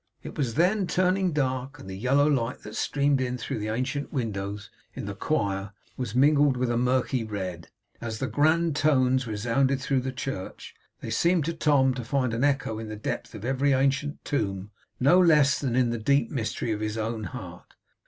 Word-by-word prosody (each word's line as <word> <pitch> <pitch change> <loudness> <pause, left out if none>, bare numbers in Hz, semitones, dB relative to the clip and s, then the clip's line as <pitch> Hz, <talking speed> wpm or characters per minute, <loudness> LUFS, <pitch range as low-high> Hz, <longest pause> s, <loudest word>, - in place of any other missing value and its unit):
It - - -8
was 125 -6 -1
then 185 +5 +2
turning 185 0 +2
dark, 130 -3 -2
and - - -11
the 95 - -6
yellow 130 +8 +2
light 125 -5 0
that 105 +1 -8
streamed 140 -1 +1
in 125 -1 -2
through 115 - -4
the 105 - -3
ancient 130 +6 -2
windows 100 -5 -4 0.2
in - - -5
the - - -4
choir 100 0 -1 0.2
was 120 -4 -4
mingled 145 0 +4
with 125 -1 0
a - - 0
murky 125 0 +1
red. 95 -6 -5 0.3
As 115 -2 -4
the 130 - -2
grand 160 +3 +2
tones 130 -4 +2
resounded 120 +6 +1
through 135 0 0
the 130 +1 -3
church, 130 -7 -6 0.3
they 115 - -5
seemed, 170 +6 +2
to 165 - -1
Tom, 145 -5 +3
to 125 -1 -5
find 130 0 0
an 115 +3 -1
echo 135 -6 0
in 110 -1 -6
the 110 - -5
depth 105 - -5
of 105 +1 -7
every 135 +2 +2
ancient 140 +2 0
tomb, 100 -6 -2 0.3
no 155 +8 +5
less 150 -6 +5
than 130 -4 -1
in 125 -2 +2
the 120 - -2
deep 140 +1 +2
mystery 115 -3 -2
of 105 - -1
his 110 0 -3
own 110 0 -3
heart. 85 - -9
130 Hz, 195 wpm, -26 LUFS, 110-145 Hz, 0.3 s, no